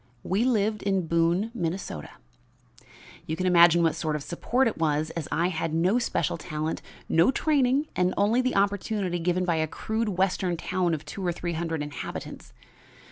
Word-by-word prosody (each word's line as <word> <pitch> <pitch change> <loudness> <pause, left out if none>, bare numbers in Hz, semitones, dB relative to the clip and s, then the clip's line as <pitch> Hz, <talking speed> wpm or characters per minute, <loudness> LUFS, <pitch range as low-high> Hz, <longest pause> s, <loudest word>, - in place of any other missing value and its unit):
We 195 +5 +1
lived 215 -3 +1
in 195 -3 0
Boone, 170 +6 +1
Minnesota. 170 - -4 1.2
"You 160 - -2
can 185 - -2
imagine 170 -1 +6
what 165 - +3
sort 155 -2 -2
of 150 - -4
support 240 - 0
it 225 - -3
was, 155 -1 0
as 165 -4 -5
I 170 +2 +1
had 165 -2 -2
no 185 +8 +3
special 170 - -1
talent, 155 0 -4 0.3
no 165 +6 +4
training 275 0 +2
and 180 0 +2
only 220 +5 +3
the 255 0 -1
opportunity 200 -2 0
given 180 +2 0
by 170 -2 +1
a 160 0 +1
crude 220 +7 -2
western 185 -2 +1
town 175 0 0
of 155 - -9
two 195 - -7
or 175 - +1
three 175 0 -4
hundred 160 -2 -2
inhabitants. 145 0 -7
180 Hz, 175 wpm, -26 LUFS, 165-205 Hz, 1.2 s, imagine